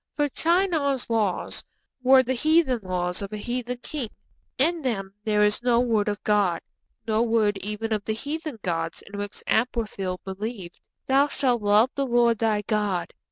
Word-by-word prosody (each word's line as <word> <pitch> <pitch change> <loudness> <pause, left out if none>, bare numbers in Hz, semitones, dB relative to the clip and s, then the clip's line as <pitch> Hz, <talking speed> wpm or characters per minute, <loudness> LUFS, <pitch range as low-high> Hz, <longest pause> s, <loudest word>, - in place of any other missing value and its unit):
For 295 -1 +1
Shinar's 320 -8 +1
laws 210 -5 0 0.4
were 260 +1 +6
the 260 +1 -1
heathen 310 -1 +3
laws 180 -1 -2
of 200 0 -5
a 215 - -4
heathen 245 +3 -3
king; 275 -8 -4 0.5
in 330 +5 +2
them 195 -8 -2
there 210 -1 +3
is 210 +2 +2
no 240 -1 +3
word 225 -4 +1
of 205 0 -2
God; 200 -5 +2 0.5
no 220 0 +2
word 220 -4 +2
even 210 +3 -3
of 210 -2 -1
the 220 - 0
heathen 300 +2 -5
gods 165 -2 -2
in 200 0 -8
which 205 0 -6
Amraphel 215 -6 -1
believed. 195 -1 -6 0.3
'_Thou 275 +2 +4
shalt 245 -5 +1
love 210 +4 +4
the 275 -1 -1
Lord 235 -2 +3
thy 215 -2 +1
God 205 -4 -1
225 Hz, 165 wpm, -25 LUFS, 205-255 Hz, 0.5 s, were